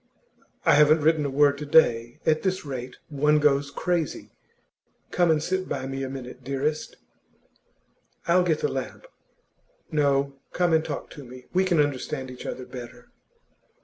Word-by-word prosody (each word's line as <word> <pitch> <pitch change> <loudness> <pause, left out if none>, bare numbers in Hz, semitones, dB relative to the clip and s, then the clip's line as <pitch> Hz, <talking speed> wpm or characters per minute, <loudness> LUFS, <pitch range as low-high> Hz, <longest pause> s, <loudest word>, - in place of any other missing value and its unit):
'I - - +6
haven't 150 +1 +5
written 155 -1 +2
a - - -3
word 140 +1 +3
to 150 - -5
day. 120 -6 +3
At 155 -1 +2
this 185 -3 -1
rate, 130 -3 -6
one 150 +1 +2
goes 145 -1 +2
crazy. 170 +1 -2 0.8
Come 175 -1 +2
and 155 -1 +2
sit 185 +2 -2
by 130 -1 -3
me 135 0 -4
a 135 - -3
minute, 130 -1 -8
dearest.' 140 +4 -2 1.3
'I'll 175 +2 +5
get 165 -4 0
the - - +2
lamp.' - - -5 0.9
'No; 140 -2 +1
come 175 -2 +1
and 160 0 +3
talk 150 -3 -6
to 145 - -10
me; 125 0 -12
we 185 +1 +3
can 175 -4 +2
understand 140 -1 -1
each 125 - -9
other 130 - -5
better. 120 -1 -10
145 Hz, 160 wpm, -25 LUFS, 135-160 Hz, 1.3 s, I